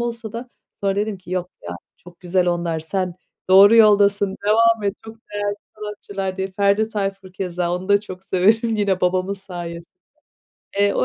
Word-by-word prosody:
olsa 230 -2 -4
da, 240 +2 -6 0.3
sonra 195 0 0
dedim 210 -1 -1
ki, 180 -1 -14
yok 180 -1 -2
ya, 85 0 -6 0.2
çok 175 0 -17
güzel 180 0 +1
onlar, 170 -2 -1
sen 180 +2 -2 0.4
doğru 200 +4 +8
yoldasın, 200 -2 +4
devam 230 +1 +4
et, 200 0 0
çok 225 0 -10 0.2
değerli 205 0 -1 0.2
sanatçılar 200 -2 -5
diye. 190 0 -2
Ferdi 200 +3 +1
Tayfur 195 -3 -4
keza, 180 -2 -2
onu 185 +2 -6
da 200 0 +5
çok 190 -2 -10
severim 220 +5 +2
yine 195 -3 +1
babamın 185 +2 +1
sayesinde. 175 -3 -8 0.9
Eee, 200 0 +3
195 Hz, 165 wpm, -21 LUFS, 180-210 Hz, 0.9 s, doğru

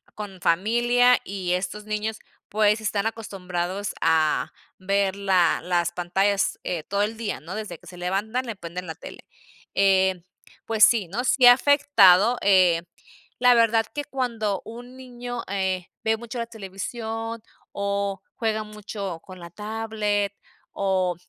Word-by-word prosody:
con 200 -4 -8
familia, 240 +8 +3
y 185 -2 -3
estos 190 +3 -3
niños, 215 +1 -3 0.3
pues 210 +1 +2
están 210 -1 -1
acostumbrados 195 -3 -3
a 160 -2 +2 0.3
ver 195 0 0
la 190 -4 +2
las 175 -1 0
pantallas, 195 +3 0
eh, 165 -4 -3
todo 200 +3 0
el 215 +2 -2
día, 225 -3 -3
¿no? 170 +6 -8
Desde 210 -6 -6
que - - -18
se 180 - -11
levantan, 205 +8 -2
le 225 -3 -5
prenden 175 0 -7
la 160 - -6
tele, - - -11 0.5
eh, 190 -2 +3 0.4
pues 220 -1 +2
sí, 215 -7 +5
¿no? 225 +8 -3
Sí 260 -1 +4
ha 245 - +11
afectado, 240 -6 +5
eh, 185 -4 +4 0.6
la 250 0 +6
verdad 230 -1 +4
que 290 - -3
cuando 230 -8 -2
un 245 +3 -10
niño, 245 -2 -7
eh, 190 -2 -2 0.2
ve 220 0 +1
mucho 235 +1 -7
la 230 - -3
televisión, 225 +2 -6 0.3
o 200 -1 -2
juega 220 -1 -1
mucho 205 -4 -6
con 185 -1 -12
la 170 0 -9
tablet, 210 0 -2 0.4
o 185 -2 0
205 Hz, 145 wpm, -24 LUFS, 185-225 Hz, 0.6 s, ha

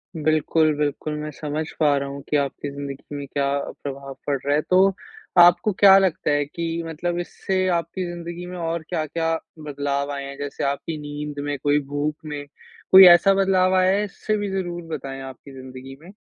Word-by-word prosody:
बिल्कुल, 155 0 +2
बिल्कुल। 150 +1 -2
मैं 150 0 -5
समझ 150 +1 -4
पा 145 -2 +4
रहा 140 0 -3
हूँ 140 0 -7
कि 150 - +1
आपकी 140 0 -3
ज़िंदगी 140 0 -7
में 140 -1 -5
क्या 140 +1 -1 0.4
प्रभाव 140 -1 -6
पड़ 140 -1 +1
रहा 145 +1 +2
है। 150 - +2
तो 185 0 +5 0.6
आपको 175 +5 +6
क्या 195 -1 +8
लगता 185 -6 +1
है 145 0 +1
कि 165 +2 -4
मतलब 175 +2 -3
इससे 185 +1 -2
आपकी 170 +3 -4
ज़िंदगी 175 0 -7
में 180 0 -7
और 165 -1 -3
क्या-क्या 165 0 -1 0.3
बदलाव 140 0 -2
आएँ 140 -1 -5
हैं, 140 0 -9
जैसे 145 -1 -5
आपकी 140 +3 -2
नींद 145 0 -6
में 145 -1 -2
कोई 145 0 +3
भूख 145 +1 -1
में, 145 -1 -6 0.5
कोई 190 0 +11
ऐसा 175 +3 +7
बदलाव 190 -1 +2
आया 185 0 +4
है 210 - 0
इससे 210 +2 -3
भी 205 -1 -3
ज़रूर 175 -2 -3
बताएँ 135 0 -7
आपकी 135 +1 -10
जिंदगी 130 0 -10
में? 180 +4 -13
150 Hz, 190 wpm, -23 LUFS, 140-175 Hz, 0.6 s, कोई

